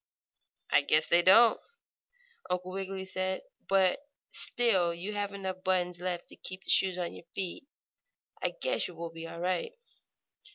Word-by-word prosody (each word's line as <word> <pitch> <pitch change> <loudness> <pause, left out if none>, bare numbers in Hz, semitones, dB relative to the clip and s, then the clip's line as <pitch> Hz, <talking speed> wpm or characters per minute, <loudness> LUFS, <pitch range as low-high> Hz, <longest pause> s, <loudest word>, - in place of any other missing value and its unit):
"I 145 - +6
guess 155 +2 +3
they 175 - +5
don't," 225 +6 +7 0.9
Uncle 180 0 -2
Wiggily 190 0 -4
said. 185 0 -2 0.3
"But 190 +1 +4 0.3
still 190 -8 +2
you 190 +5 -5
have 205 -1 -2
enough 190 -2 -5
buttons 180 -2 0
left 180 -1 -3
to - - -13
keep 185 +1 -7
the - - +1
shoes 185 -2 +3
on 175 -1 -3
your - - -12
feet. 190 +7 -4 0.7
I - - -1
guess - - 0
you 180 - -11
will 165 0 -6
be 165 0 -8
all 170 - -8
right." 180 0 -1
185 Hz, 160 wpm, -30 LUFS, 175-195 Hz, 0.9 s, don't